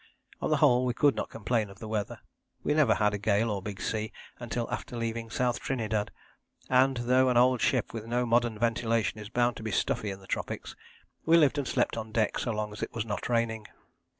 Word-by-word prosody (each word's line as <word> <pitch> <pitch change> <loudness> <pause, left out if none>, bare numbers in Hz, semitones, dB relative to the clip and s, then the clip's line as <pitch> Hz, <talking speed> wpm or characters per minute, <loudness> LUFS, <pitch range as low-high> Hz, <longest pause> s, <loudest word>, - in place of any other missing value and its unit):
On - - -1
the - - +3
whole 125 0 +4
we 125 -1 0
could 145 0 +4
not - - -3
complain 110 -1 -1
of 100 - -13
the 110 - -8
weather. 105 -2 -3 0.4
We - - +1
never 150 -7 +4
had 105 -1 +2
a 105 - -2
gale 105 +2 +2
or 100 -2 -2
big 100 -1 -6
sea 110 0 -2 0.3
until 120 -1 -3
after 120 - -4
leaving 115 0 -3
South 125 +1 0
Trinidad, 110 -5 -1 0.6
and 130 +1 +4
though 125 +2 +3
an 125 - +2
old 125 0 +4
ship - - +1
with 115 -1 -6
no 120 +1 0
modern 120 -1 +2
ventilation 115 -2 0
is 105 0 -8
bound 120 +1 +1
to - - -8
be 110 - -3
stuffy 105 +3 0
in 95 0 -6
the 95 - -15
tropics, - - -4 0.5
we 165 +1 +5
lived 145 -2 +4
and 135 - -2
slept - - 0
on 110 -1 -5
deck 110 -1 +1
so 120 - -1
long 105 -1 -3
as 105 - -9
it - - -4
was 110 -1 -2
not 105 +1 -4
raining. 115 -2 0
115 Hz, 225 wpm, -29 LUFS, 110-125 Hz, 0.6 s, we